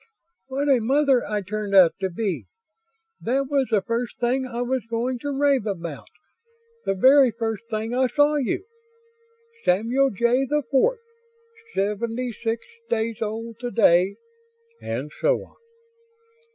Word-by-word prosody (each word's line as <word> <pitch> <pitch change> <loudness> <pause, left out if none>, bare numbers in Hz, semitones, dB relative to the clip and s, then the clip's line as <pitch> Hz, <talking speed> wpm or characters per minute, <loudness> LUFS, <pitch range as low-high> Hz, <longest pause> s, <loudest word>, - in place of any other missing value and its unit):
"What 275 +2 -2
a 270 -3 +5
mother 270 +2 +3
I 210 -1 -2
turned 205 +1 -3
out 180 -4 +7
to 190 -1 -1
be! 190 0 -3 0.8
That 270 +4 -1
was 275 -2 +2
the 210 -4 +2
first 230 +1 -3
thing 255 +2 0
I 240 0 -3
was 255 +1 -1
going 240 +2 -1
to 285 - -4
rave 275 -4 +1
about, 170 -7 -5 0.8
the 195 - 0
very 265 +6 +6
first 225 -1 -4
thing 220 +1 -3
I 260 +1 +2
saw 290 +3 +3
you! 280 +7 -1 1.0
Samuel 235 +9 +2
Jay 235 +4 +2
the 295 +2 0
Fourth, 465 - +2 0.7
seventy 225 +5 -1
six 225 0 -3 0.2
days 225 0 -1
old 225 +1 -4
today." 200 -6 +3 0.7
And 130 +6 -4
so - - +2
on. - - -25
235 Hz, 140 wpm, -24 LUFS, 210-265 Hz, 1.0 s, out